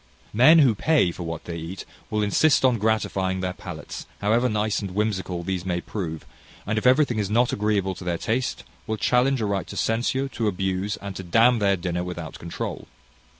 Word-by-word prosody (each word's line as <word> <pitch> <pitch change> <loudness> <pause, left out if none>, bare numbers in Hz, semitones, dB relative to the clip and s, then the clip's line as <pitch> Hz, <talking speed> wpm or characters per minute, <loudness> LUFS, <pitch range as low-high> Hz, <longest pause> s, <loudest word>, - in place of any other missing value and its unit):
Men 140 +9 +7
who 135 -7 +6
pay 140 - +2
for 90 - -9
what 80 -2 -5
they 85 -1 -5
eat 85 +4 -7 0.2
will 105 0 0
insist 135 +8 +3
on 125 -3 +3
gratifying 95 -3 0
their 90 0 -2
palates, - - -8
however 115 +5 +2
nice 105 -1 0
and 95 -3 -6
whimsical 95 -4 -1
these 95 -1 -2
may 90 -1 -1
prove; 80 - -5 0.4
and 110 +2 0
if 115 - +1
everything 130 -3 +3
is 100 -2 -1
not 120 +3 +2
agreeable 100 -2 0
to 95 - -10
their 90 -1 -1
taste, 115 - -2 0.2
will 110 - -2
challenge 125 +3 +2
a - - 0
right 100 -2 -2
to - - -8
censure, 125 +4 0
to 115 -4 -2
abuse, 95 +1 -1
and 100 -1 -6
to - - -5
d 90 +4 -1
n 120 +1 +5
their 100 -2 +2
dinner 90 0 -2
without 85 -3 -6
controul. 85 - -5
105 Hz, 200 wpm, -24 LUFS, 90-115 Hz, 0.4 s, Men